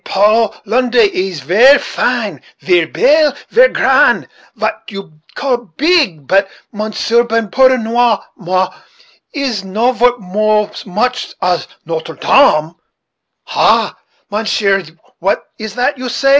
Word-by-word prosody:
Paul, 210 +2 +2
Londre, 245 +2 +2
is 185 -5 -1
ver 225 - +5
fine; 215 - -2 0.2
ver 175 -3 +1
belle; 300 - +2 0.2
ver - - +6
grand - - +2 0.3
vat - - -3
you 195 -7 -10 0.2
call 245 -5 -2
beeg; 285 - +1
but, 195 +5 +2 0.2
Monsieur 220 +2 0
Ben, 230 -3 -2
pardonnez 245 -3 +3 0.2
moi, 185 0 -2 0.6
it 290 - -6
is 245 -8 -2
no 215 +6 0
vort 215 -3 0
so - - -10
much 250 +7 -2
as 180 -1 -1 0.2
Notre 160 0 -5
Dame." 160 - +3 0.7
"Ha! - - +1 0.4
mounsheer, 205 -2 0 0.4
what 195 +3 -1 0.2
is 220 -1 -7
that 250 +2 -1
you 255 -1 -4
say?" 275 +3 0
220 Hz, 125 wpm, -14 LUFS, 190-250 Hz, 0.7 s, ver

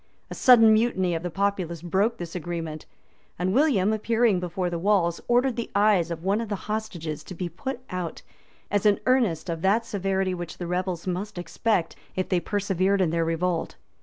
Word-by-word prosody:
A - - -2
sudden 225 -3 +7
mutiny 215 -5 +2
of 165 - -2
the 175 - -3
populace 185 -3 -2
broke 200 +7 +1
this 170 -2 -7
agreement; 165 -3 -5 0.5
and 185 +2 0
William, 225 -7 +3
appearing 220 -2 +2
before 180 +1 -2
the 170 -1 -3
walls, 180 -3 +2
ordered 245 +1 +2
the 235 - -3
eyes 200 -4 +3
of 165 -1 -5
one 200 +4 +1
of 230 - -5
the 205 - -1
hostages 175 -8 -4
to 185 - -9
be 180 +1 -3
put 240 - -5
out, 180 -3 -4 0.5
as 205 +1 +2
an 205 - +4
earnest 235 -12 +2
of 165 -2 -3
that 210 +5 +2
severity 195 -3 -1
which 175 -2 -6
the 175 - -5
rebels 180 0 -2
must 185 +2 -3
expect, 175 0 -1 0.2
if 185 - -2
they 180 - +2
persevered 200 0 0
in 180 -4 +2
their 165 0 +1
revolt. 165 - -1
185 Hz, 190 wpm, -25 LUFS, 175-215 Hz, 0.5 s, sudden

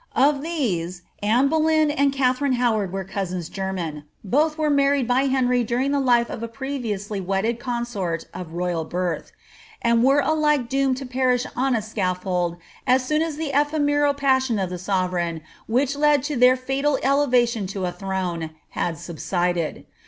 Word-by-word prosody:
Of 280 +1 +3
these, 185 - -2 0.2
Anne 230 +6 +3
Boleyn 315 0 +3
md 280 -2 +2
Katharine 270 0 +1
Howard 225 -6 +1
were 195 0 -3
cousins 185 -3 -4
german: 175 -6 -4 0.2
both 300 - +1
were 305 -1 +1
married 280 -2 +2
by 255 +2 +2
Henry 250 -2 +2
during 245 +4 0
the 285 - +2
life 240 -3 +3
of - - -6
a 230 - -3
previously 230 -6 -4
wedded 195 +5 -1
consort 235 -9 -3
of 175 -2 -7
royal 175 -1 -1
birth, 175 +1 -3 0.5
■id 235 0 +4
were 270 +3 +5
alike 300 -4 +2
doomed 270 -1 +1
to 270 - -6
perish 250 0 +1
on 260 0 +1
a 220 - -1
scaffold 180 -4 -1 0.3
as 255 +1 +3
soon 305 +3 +1
as 325 -2 -1
the 310 -2 -3
ephemeral 290 0 +2
pmioD 260 -6 +2
of 180 - -4
the 180 - -4
sovereign, 180 -3 -1 0.3
which 260 +4 +1
led 295 -2 +3
to 295 +1 -2
their 250 +1 +6
fatal 270 +2 0
elevation 250 -6 +2
to 190 -1 -3
a 180 - -1
throne, 180 -4 -3 0.2
had 165 -2 -2
subsided. 175 +1 -2
245 Hz, 165 wpm, -23 LUFS, 185-275 Hz, 0.5 s, their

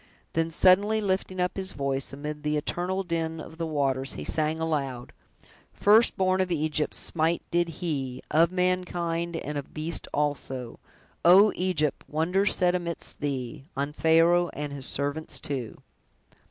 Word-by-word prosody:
Then, 165 0 +1
suddenly 195 +6 +4
lifting 190 -2 -1
up 180 +1 0
his 190 -1 -2
voice, 135 -1 -2
amid 150 +2 -6
the 150 0 0
eternal 180 +5 -2
din 165 -2 -2
of 160 +1 -10
the 165 - -1
waters, 135 -3 -1
he - - -6
sang 155 0 -1
aloud: 140 -6 -3 0.6
"First 215 +3 +4
born 185 0 +2
of 185 - -1
Egypt, 155 -2 -1
smite 165 +1 0
did 175 0 +1
he, 145 -6 -4
Of 165 +2 +4
mankind, 175 -2 -1
and 150 -2 -3
of 140 - -11
beast 160 +1 0
also: 135 -4 -2 0.4
O, 195 +5 +7
Egypt! 175 -5 0
wonders 180 +6 +2
sent 180 -1 +2
'midst 170 -2 -4
thee, 135 -3 -4
On 140 +1 -2
Pharaoh 165 +3 +4
and 145 -1 -4
his 135 -2 0
servants 145 +3 -2
too!" 130 -6 -5
160 Hz, 150 wpm, -27 LUFS, 145-180 Hz, 0.6 s, O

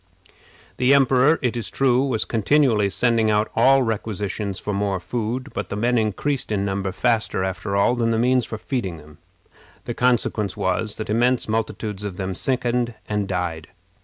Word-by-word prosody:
The 130 +2 +4
emperor, 135 +3 +4
it 125 -1 0
is 115 -4 -4
true, 130 -1 +2
was 130 -6 0
continually 115 -2 +2
sending 115 +1 +2
out 105 0 +1
requisitions 110 -5 +1
for 105 - -4
more 100 -1 -1
food; 120 +7 -3
but - - -4
the - - -3
men 120 +3 +1
increased 110 +5 -1
in 100 -2 0
number 95 -1 -2
faster, 115 -2 0
after 95 +1 -3
all, 100 +4 +3
than 120 -2 0
the 115 - +1
means 125 +1 +2
for 110 - -5
feeding 105 -8 -3
them. 75 -1 -16 0.7
The 120 - -3
consequence 115 -4 0
was, 100 +2 -1
that 110 -1 -4
immense 120 +3 +2
multitudes 110 -2 -3
of 100 -3 -5
them 95 -1 -3
sickened 120 +1 -1
and 105 -2 -1
died. 90 -4 -3
110 Hz, 165 wpm, -22 LUFS, 100-125 Hz, 0.7 s, The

